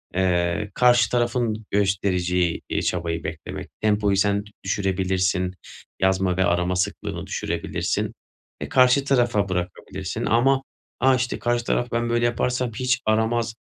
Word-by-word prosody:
eee, 90 +2 +1
karşı 120 -2 +4
tarafın 120 -2 0
göstereceği, 90 -3 +1
iii, - - -1
çabayı 85 -1 -2
beklemek, - - -6
tempoyu 105 -2 +2
sen 100 +1 +2 0.2
düşürebilirsin. 95 -1 0 0.5
Yazma 95 -1 +2
ve 95 - +3
arama 90 0 +1
sıklığını 90 0 -3
düşürebilirsin. - - -2 0.5
E, - - -4
karşı 130 +2 +5
tarafa 120 -7 +2
bırakabilirsin 90 -1 -4
ama 135 +4 +3 0.4
"a, 130 +1 +4
işte, 125 -1 -2
karşı 120 0 0
taraf 120 - 0
ben 115 0 0
böyle 120 0 +2
yaparsam 125 +1 0
hiç 125 0 0
aramaz, 110 +1 +1
105 Hz, 125 wpm, -23 LUFS, 95-120 Hz, 0.5 s, karşı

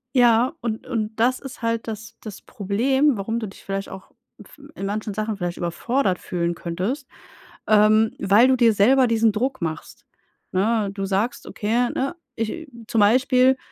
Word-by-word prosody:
Ja, 245 +2 +4
und 225 -2 -4
und 220 -2 -2
das 250 +3 +2
ist 270 +1 -10
halt 230 0 -1
das 220 +1 -7
das 215 -3 -9
Problem, 255 +6 +1
warum 225 +4 -2
du 220 - -4
dich 195 - -14
vielleicht 195 0 -4
auch 190 - -11 0.3
f 295 - -19 0.2
in 195 - -5
manchen 210 +1 -3
Sachen 215 0 -3
vielleicht 175 -2 -4
überfordert 185 +3 -1
fühlen 170 -1 -2
könntest. 190 - -4 0.6
Ähm, 215 +1 +4
weil 205 +5 +5
du 260 - +4
dir 235 -2 +4
selber 255 +6 +4
diesen 225 -1 +3
Druck 255 +3 -2
machst. 160 -2 -6 0.5
Ne, 210 +2 +1
du 195 -1 -3
sagst: 200 +5 -1
„Okay, 235 +4 0
ne, 275 +5 -2 0.2
ich 230 +9 -4 0.2
zum 225 - 0
Beispiel, 255 +4 +4
220 Hz, 165 wpm, -22 LUFS, 200-250 Hz, 0.6 s, weil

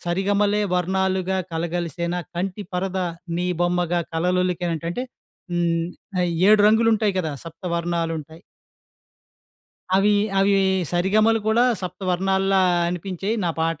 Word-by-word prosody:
'సరిగమలే 200 +4 +1
వర్ణాలుగా 190 +1 0 0.2
కలగలిసినా 170 +1 -2 0.2
కంటి 190 +3 -3
పరద 185 +1 -2 0.4
నీ 180 - -1
బొమ్మగా 175 0 +1
కలలొలికేన' 180 0 0
అంటే 245 +8 -3 0.5
హ్మ్, 170 -1 +1 0.4
అయి 180 -1 +1 0.2
7 215 0 +6
రంగులుంటాయి 220 -2 +3
కదా! 160 -4 -3
సప్త 165 +2 -11
వర్ణాలుంటాయి. 165 -1 -3 1.5
అవి 200 +2 +4 0.3
అవి 195 +1 +4 0.4
సరిగమలు 215 +5 +3
కూడా 230 +3 +4 0.2
సప్తవర్ణాల్లా 190 +1 0 0.3
అనిపించాయి 185 +4 -3
నా 170 - +1
పాట, 165 -1 0
180 Hz, 105 wpm, -23 LUFS, 170-195 Hz, 1.5 s, 7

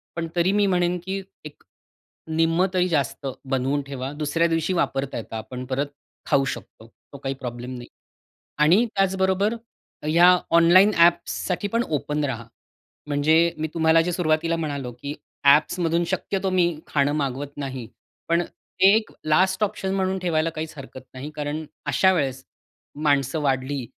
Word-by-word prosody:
पण 170 -1 -3
तरी 175 +2 +2
मी 205 0 +3
म्हणेन 180 -1 +1
की 195 +1 -3 0.2
एक 150 - -11 0.8
निम्मं 165 +3 +3
तरी 180 0 +2
जास्त 140 -4 -1 0.2
बनवून 135 +1 0
ठेवा. 135 -1 -6
दुसऱ्या 155 +3 0
दिवशी 165 +2 0
वापरता 135 -6 -1
येत, 115 - -9
आपण 115 +3 -6
परत 135 +3 -1 0.4
खाऊ 135 - +3
शकतो, 110 - -14 0.3
तो 140 - -9
काही 135 0 -3
प्रॉब्लेम 125 0 -6
नाही. 120 0 -10 0.7
आणि, 170 +10 +5
त्याचबरोबर 190 +2 +1 0.5
या 175 +3 +6 0.2
ऑनलाइन 185 +5 +6
ॲप्ससाठी 175 +3 +2
पण 235 - +3
ओपन 150 0 -1
रहा, 120 -4 -4 0.6
म्हणजे 155 +3 +3
मी 155 +1 -2
तुम्हाला 160 0 +4
जे 180 - -1
सुरुवातीला 165 -1 +1
म्हणालो 140 -6 -4
की 145 +1 -4 0.3
ॲप्समधून 165 +4 +3
शक्यतो 195 +2 -2
मी 180 -2 +2
खाणं 145 -1 +1
मागवत 140 +2 -5
नाही, 130 -5 -5 0.4
पण 170 +1 +3 0.4
एक 215 +3 +5
लास्ट 185 +6 +2
ऑप्शन 195 -2 -3
म्हणून 190 0 0
ठेवायला 165 -3 0
काहीच 155 0 -6
हरकत 135 -1 -9
नाही, 135 +4 -7
कारण 150 +1 -3 0.2
अशा 190 0 +3
वेळेस 135 -6 -1 0.6
माणसं 140 +1 +2
वाढली 135 -1 -1
155 Hz, 145 wpm, -24 LUFS, 140-180 Hz, 0.8 s, या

